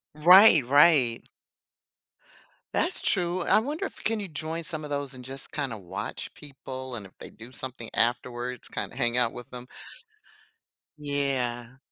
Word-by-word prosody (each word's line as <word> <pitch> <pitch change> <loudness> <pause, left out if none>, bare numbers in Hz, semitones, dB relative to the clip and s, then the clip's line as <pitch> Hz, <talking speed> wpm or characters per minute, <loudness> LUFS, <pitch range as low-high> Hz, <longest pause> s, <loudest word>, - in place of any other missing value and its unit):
Right, 175 - +7
right. 135 -3 +5 1.5
That's - - 0
true. 175 +1 0
I 175 - +4
wonder 300 - -3
if - - -8
can 225 0 0
you 200 - -5
join 160 +1 -5
some 155 0 -4
of 150 - -8
those 140 -2 -3
and 125 -1 -11
just 135 +1 -5
kinda 140 -6 -3
watch 95 -2 -6
people 130 -2 -8
and 105 -4 -7
if 95 - -26
they - - -9
do 115 +3 -13
something 125 -3 -6
afterwards, 120 +1 0
kinda - - -5
hang 120 -2 +2
out 120 -2 +2
with 125 -1 -10
them. 125 0 -8 1.3
Yeah. 135 -4 -2
135 Hz, 150 wpm, -27 LUFS, 120-155 Hz, 1.5 s, Right